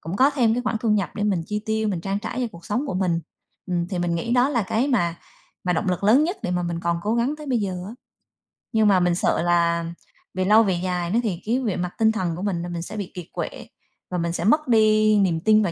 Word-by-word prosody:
cũng 170 +5 -5
có 270 +3 +5
thêm 240 -6 +2
cái 245 - -1
khoản 240 -2 -1
thu 230 - -1
nhập 205 -4 +1
để 205 - -3
mình 195 -5 +1
chi 210 0 -3
tiêu, 220 0 0
mình 185 -5 -2
trang 195 +3 -2
trải 220 +3 -5
cho 245 - 0
cuộc 170 - -13
sống 245 +8 -1
của - - -3
mình. 180 -3 0 0.5
Ừm, 175 -1 -1
thì 180 -2 -3
mình 175 -1 0
nghĩ 200 +8 -2
đó 250 +2 +4
là 240 -6 +1
cái 225 +8 0
mà 175 -10 +1 0.5
mà 180 - +1
động 185 - -1
lực 180 +2 -1
lớn 255 +9 +5
nhất 360 +5 -2
để - - -2
mà 180 0 0
mình 170 -1 -3
còn 170 0 0
cố 215 +2 0
gắng 240 +5 +1
tới 300 -1 -10
bây 250 -3 +1
giờ 195 -3 -2 0.2
á. 220 - -7 0.8
Nhưng 220 -1 +3
mà 190 -2 +5
mình 175 -1 +2
sợ - - +1
là 170 -1 +2 0.5
về 185 0 -1
lâu 215 +3 +6
về 190 -4 +1
dài 180 -2 -1
đó 230 - +3
thì 190 -5 -2
cái 240 +4 +1
về 220 -7 -1
mặt 180 0 -3
tinh 220 -1 +4
thần 180 -7 -2
của 180 - -6
mình 190 -4 -1
là 175 - -5
mình 170 -1 -4
sẽ 215 +5 -7
bị 200 -3 -5
kiệt 180 -2 -7
quệ, - - -5 0.4
và 180 - -1
mình 170 0 -1
sẽ 170 - -3
mất 300 - +3
đi 215 -2 +4
niềm 175 -5 +2
tin 215 +3 +4
vào 180 - 0
200 Hz, 285 wpm, -23 LUFS, 175-225 Hz, 0.8 s, lâu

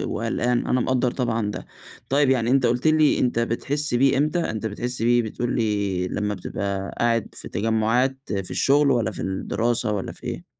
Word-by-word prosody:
وقلقان 120 0 0
أنا 125 - +2
مقدّر 125 0 +1
طبعًا 115 -5 -1
ده. - - -7 0.4
طيب 140 0 +3
يعني 120 -3 +2
أنت 130 0 +3
قلت 125 +5 +1
لي 155 -1 +4
أنت 120 -2 +1
بتحس 135 +5 -1
بيه 135 +2 +3
إمتى؟ 155 +5 +1
أنت 110 -9 -3
بتحس 120 +4 -3
بيه 120 +1 +4
بتقول 120 +2 -3
لي 100 -5 0
لما 105 +2 -2
بتبقى 100 +1 -4
قاعد 115 -2 +1
في - - -7
تجمعات 115 +6 +1 0.2
في 95 -2 -3
الشغل، 140 +1 +3
والّا 120 -6 +1
في - - -7
الدراسة 115 +4 -1
والّا 100 -2 -3
في - - -16
إيه؟ - - -5
120 Hz, 180 wpm, -23 LUFS, 105-130 Hz, 0.4 s, لي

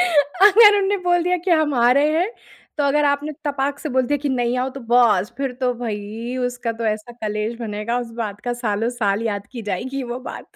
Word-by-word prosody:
अगर 365 +6 +6
उन्होंने 400 0 +1
बोल 350 -1 +3
दिया 360 +1 +1
कि 380 - 0
हम 310 -3 +3
आ 240 -1 +4
रहे 285 +3 +3
हैं, 365 +5 0 0.5
तो 290 - +2
अगर 295 +1 +2
आपने 285 +1 0
तपाक 285 -1 -1
से 305 - -5
बोल 260 -2 +1
दिया 290 +2 0
कि 290 - 0
नहीं, 245 -2 0
आओ। 255 +1 0
तो 275 - -9
बस! 235 -4 +3
फिर 270 -1 -2
तो 250 -1 +1
भई 225 +1 -5
उसका 245 -1 -3
तो - - -1
ऐसा 215 +3 -8
क्लेश 215 +2 -2
बनेगा 220 +1 -2
उस 240 -1 -7
बात 205 -2 -6
का 245 - -1
सालों-साल 215 -1 0
याद 205 -3 -3
की 235 -3 -6
जाएगी 260 +9 -3
वो 245 - -4
बात। - - -9
250 Hz, 215 wpm, -21 LUFS, 230-290 Hz, 0.5 s, अगर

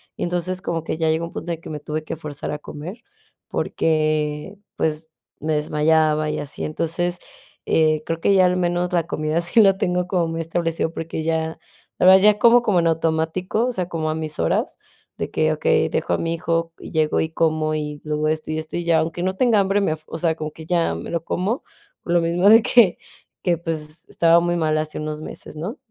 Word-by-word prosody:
y - - -4
entonces, 180 +1 -2
como 165 -3 -2
que - - -2
ya 160 -1 +1
llegó 160 +1 0
un 170 - -10
punto 175 - -5
en 165 - -2
el - - -23
que - - -9
me 150 -1 -6
tuve 155 +1 -4
que - - -4
forzar 150 -2 -6
a 150 - -4
comer, 165 +11 -8 0.5
porque, 155 +3 -1 0.2
pues, 160 0 -1 0.3
me 155 +1 -1
desmayaba 155 0 +2
y - - -2
así. 145 - -5
Entonces, 175 +3 -2 0.5
eh, 155 -1 +2
creo 165 0 -2
que 200 - +3
ya 185 -1 +5
al 180 0 +2
menos 175 0 0
la 170 - +2
comida 155 0 -1
sí 175 +7 +2
la 195 -2 +5
tengo 180 -1 0
como 180 -3 +1
muy 165 0 -3
establecido, 165 0 -1
porque 160 -1 -4
ya, 160 0 -1 0.4
la - - +3
verdad 190 0 +8
ya 210 0 +5
como, 235 +2 +6
como 200 -6 +3
en 170 - +2
automático. 165 +6 0
O - - 0
sea, 185 -6 -3
como 160 -2 -2
a - - -2
mis 155 -1 -4
horas, - - 0 0.4
de - - -3
que, - - +2
okey, - - +2
dejo - - -1
a - - +2
mi 165 0 -1
hijo, 165 0 -1
llego 155 -1 0
y 160 - 0
como, 155 -1 +1
y 150 -1 -4
luego 150 0 -1
esto, 155 0 -2
y 155 - -2
esto, 160 +1 -5
y 175 - -2
ya. 165 -1 +4
Aunque 165 +2 -2
no 190 0 -1
tenga 230 -2 +3
hambre 200 +1 +2
me 195 - +1
af 155 - -10
o - - -6
sea, 160 -1 +1
como 155 -1 -5
que 160 +1 -11
ya 170 -2 +1
me - - -7
lo 165 -1 -2
como, 200 - -2 0.4
por 170 - -2
lo 175 - +4
mismo 175 +4 +3
de 225 +1 +8
que 220 -7 +5 0.5
que 175 -2 +2
pues, 160 0 -6
estaba 170 0 +4
muy 175 0 0
mal 155 -1 +1
hace 155 0 -3
unos 155 0 -4
meses, 155 - -9
¿no?, 195 - -5
165 Hz, 225 wpm, -22 LUFS, 155-175 Hz, 0.5 s, verdad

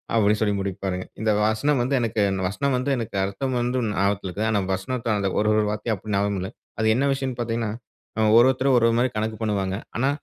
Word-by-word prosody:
அப்டினு 105 -1 +3
சொல்லி 105 -2 +2
முடிப்பாருங்க. 95 -1 -3 0.2
இந்த 110 -1 +2
வசனம் 120 +5 +1
வந்து 135 +3 0
எனக்கு, 110 -2 0 0.3
வசனம் 135 +8 -1
வந்து 130 +3 -1
எனக்கு 115 -4 -5
அர்த்தம் 125 +6 -2
வந்து 125 +1 0
ஞாபகத்தில 100 0 0
இருக்குது. 105 +5 -2
ஆனால் 100 -3 0
வசனத்தை 115 +4 -2
அந்த 100 -1 0
ஒரு 105 - 0
ஒரு 110 0 +3
வார்த்தையா 105 +1 -2
அப்டி 105 +2 -6
ஞாபகம் 100 -1 0
இல்லை. 95 - -5 0.3
அது 110 - +2
என்ன 135 +4 +1
விஷயம்னு 135 -2 -3
பார்த்தீங்கன்னா, 115 -2 -2 0.6
ஒவ்வொருத்தரும் 130 +4 +5
ஒவ்வொரு 115 -1 +4
மாரி 130 - +2
கணக்கு 110 0 -2
பண்ணுவாங்க. 100 -3 -1 0.2
ஆனா, 130 +4 +2
110 Hz, 195 wpm, -24 LUFS, 100-125 Hz, 0.6 s, ஒவ்வொருத்தரும்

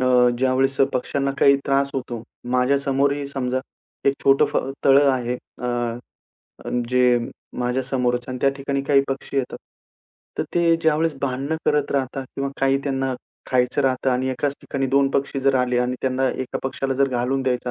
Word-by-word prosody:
अ, 125 -1 +4
ज्यावेळेस 130 +1 +2 0.2
पक्ष्यांना 135 +2 -1
काही 140 0 +6
त्रास 140 0 +2
होतो, 120 -3 -4 0.3
माझ्या 125 +2 +3
समोरही 140 +1 0
समजा 130 -2 -2 0.5
एक 135 - +2
छोटं 135 0 +5
फ - - -3 0.3
तळं 140 +1 +6
आहे. 125 -1 -1 0.3
अ, - - -1 1.0
अ, - - -5 0.2
जे 125 -1 +4 0.4
माझ्या 125 +1 0
समोरच 125 -2 -1
आणि 130 0 -4
त्या 140 - +4
ठिकाणी 140 0 -2
काही 140 -1 +4
पक्षी 135 +1 -4
येतात. 130 -2 -1 0.8
तर - - +2
ते 170 -1 +4
ज्यावेळेस 160 0 +2
भांडणं 140 +4 -1
करत 150 -1 +1
राहतात 135 -1 -2
किंवा 140 0 -2
काही 135 0 +3
त्यांना 135 -1 -1 0.4
खायचं 125 +2 +2
राहतं 130 0 +1
आणि 125 +1 0
एकाच 140 +2 -1
ठिकाणी 135 -1 -2
2 135 +1 +3
पक्षी 140 0 -1
जर 135 0 +2
आले 125 -1 +1
आणि 125 +1 0
त्यांना 130 0 +1
एका 130 - -4
पक्ष्याला 135 0 -2
जर 135 +1 +2
घालून 130 +2 -1
द्यायचा 125 -1 -1
135 Hz, 170 wpm, -22 LUFS, 125-140 Hz, 1.0 s, काही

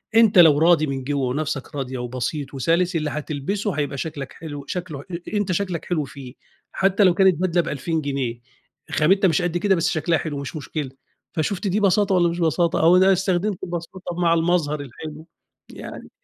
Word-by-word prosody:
أنت 220 -5 +6
لو 155 -4 +8
راضي 165 -2 +4
من 135 -1 -3
جوّه 140 -1 -1
ونفسك 145 0 -3
راضيه 130 -2 -4
وبسيط 130 +3 -4
وسَلِس، 170 +7 +1
اللي 155 -2 0
هتلبسه 155 +8 -3
هيبقى 145 -1 -2
شكلك 140 -2 -5
حلو 145 -3 -8
شكله 175 -6 -5
ح - - -17
أ 170 +4 -7
أنت 200 -2 0
شكلك 180 -2 -2
حلو 160 -4 -1
فيه، 135 -2 -10 0.4
حتى 195 +2 +2
لو 180 -2 +5
كانت 190 -1 +4
بدلة 175 -1 +2
ب2000 160 +2 -2
جنيه 135 -4 -3 0.5
خامتها 190 +6 +3
مش 165 0 +2
قد 175 -1 -1
كده، 195 +1 +2
بس 170 0 +1
شكلها 160 +1 +1
حلو 150 -3 -4
مش 140 +1 -6
مشكلة، 150 -1 -4 0.4
فشُفت 185 +4 -1
دي 200 +3 +1
بساطة 200 -1 +3
والَّا 175 -1 +3
مش 170 +1 -4
بساطة 165 +1 +1
أو 170 +3 +6
إن 185 - +5
أنا 195 0 +5
استخدمت 190 +1 -1
البساطة 175 +1 -6
مع 170 -1 +3
المظهر 165 -3 +1
الحلو، 155 +5 -9 0.4
يعني. - - -9
165 Hz, 190 wpm, -22 LUFS, 145-180 Hz, 0.5 s, لو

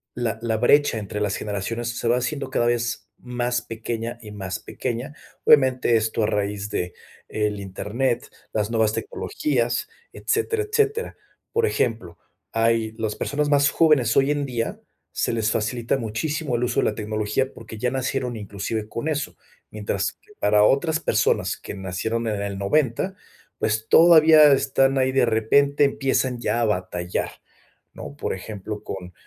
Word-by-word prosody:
la 115 -3 -2
la 115 -1 0
brecha 125 +1 +4
entre 105 0 -5
las 105 -1 0
generaciones 110 +3 -3
se - - -2
va 120 +1 +3
haciendo 130 +2 -2
cada 120 - +1
vez 120 0 -1
más 125 0 -2
pequeña 115 +1 -5
y 105 -2 -10
más 95 -3 -5
pequeña. 125 +5 -5 0.3
Obviamente, 130 -4 +5
esto 110 0 +1
a - - +3
raíz 105 -1 -2
de 90 -3 -3 0.4
el 105 -1 -1
Internet, 115 +6 -2 0.2
las 105 -1 -1
nuevas 110 -2 +2
tecnologías, 120 -3 -1 0.2
etcétera, 440 0 0
etcétera. 440 +1 0 0.4
Por 460 0 +2
ejemplo, 110 - -1 0.3
hay 115 -1 +1
las 110 -2 -2
personas 145 +1 -1
más 140 -1 +4
jóvenes 145 -9 +3
hoy 135 +1 +4
en 145 -1 0
día, 120 -4 -3 0.3
se - - -1
les 110 -1 +1
facilita 115 +3 0
muchísimo 135 +5 -2
el 120 - 0
uso 120 - 0
de - - 0
la 105 - -1
tecnología 110 +5 -1
porque 115 -1 -10
ya 125 +3 0
nacieron 130 -1 -2
inclusive 105 +1 -4
con 115 +7 -4
eso, 150 -2 -2 0.4
mientras 100 -2 -2
que 210 - -23
para 105 0 +4
otras 155 +8 +3
personas - - +1
que - - -8
nacieron 100 +5 -3
en 105 -2 -1
el 100 -1 -3
90, 145 - +1 0.4
pues 110 +1 -1
todavía 160 -2 +8
están 135 0 +2
ahí 130 0 +2
de 130 -1 +3
repente 140 +6 +3
empiezan 135 -2 0
ya 120 0 0
a - - +3
batallar, 90 -3 -2 0.6
¿no? - - -9
Por - - -2
ejemplo, 105 +2 -7
con, 90 -3 -7
115 Hz, 160 wpm, -23 LUFS, 105-135 Hz, 0.6 s, todavía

